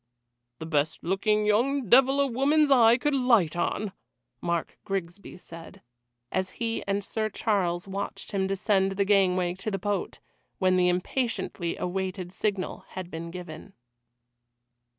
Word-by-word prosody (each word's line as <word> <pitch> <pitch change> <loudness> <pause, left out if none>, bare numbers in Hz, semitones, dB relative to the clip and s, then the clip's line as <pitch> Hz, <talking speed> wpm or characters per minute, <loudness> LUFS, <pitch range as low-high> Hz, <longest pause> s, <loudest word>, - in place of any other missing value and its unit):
"The 160 - -7
best 155 -1 -1
looking 210 +4 +1
young 245 +5 +2
devil 270 +5 +5
a 280 - +4
woman's 280 +4 +2
eye 235 -3 +6
could 295 +3 0
light 235 - +3
on!" 195 +3 -1 0.5
Mark 170 -1 -2
Grigsby 195 0 -5
said, 165 -2 -12 0.5
as 185 0 -2
he 230 -1 -2
and 200 0 0
Sir 215 +2 -2
Charles 185 -4 -1
watched 195 +1 -5
him 190 -1 0
descend 195 0 +1
the 200 +1 0
gangway 185 -3 +3
to 195 +5 -5
the 195 - -2
boat, 205 +2 -2 0.4
when 185 -2 +3
the 180 -1 +4
impatiently 180 -2 -2
awaited 185 0 -3
signal 200 -3 -2
had 185 -1 -7
been 165 +1 -6
given. 175 +1 -9
195 Hz, 140 wpm, -27 LUFS, 180-220 Hz, 0.5 s, eye